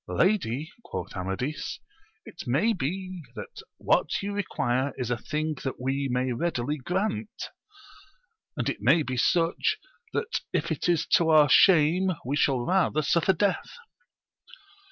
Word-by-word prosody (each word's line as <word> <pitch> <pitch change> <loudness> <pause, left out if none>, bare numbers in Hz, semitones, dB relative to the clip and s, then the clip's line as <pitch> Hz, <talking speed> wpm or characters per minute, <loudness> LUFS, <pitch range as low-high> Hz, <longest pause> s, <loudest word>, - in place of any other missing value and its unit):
Lady, 160 - 0
quoth 90 -2 -6
Amadis, 95 +11 -3 0.5
it - - -10
may 155 - +2
be 185 +2 -4
that 105 - -8 0.2
what - - +1
you 200 0 -3
require 135 -9 -1
is 125 -2 -3
a - - +2
thing 155 +5 -2
that 135 - -4
we 135 +2 -1
may 125 +1 0
readily 145 0 -1
grant; 195 - -3 1.1
and - - -1
it - - -1
may 160 -1 +4
be 130 -2 -3
such, 165 +6 +2 0.3
that 460 +1 -2
if - - -1
it - - -1
is 170 -3 +2
to 165 -1 +3
our 155 -2 +6
shame 180 +4 +5
we 135 +3 -1
shall 135 -3 +2
rather 180 -4 +2
suffer 170 +4 +3
death. 195 +2 -1
155 Hz, 140 wpm, -27 LUFS, 130-185 Hz, 1.1 s, our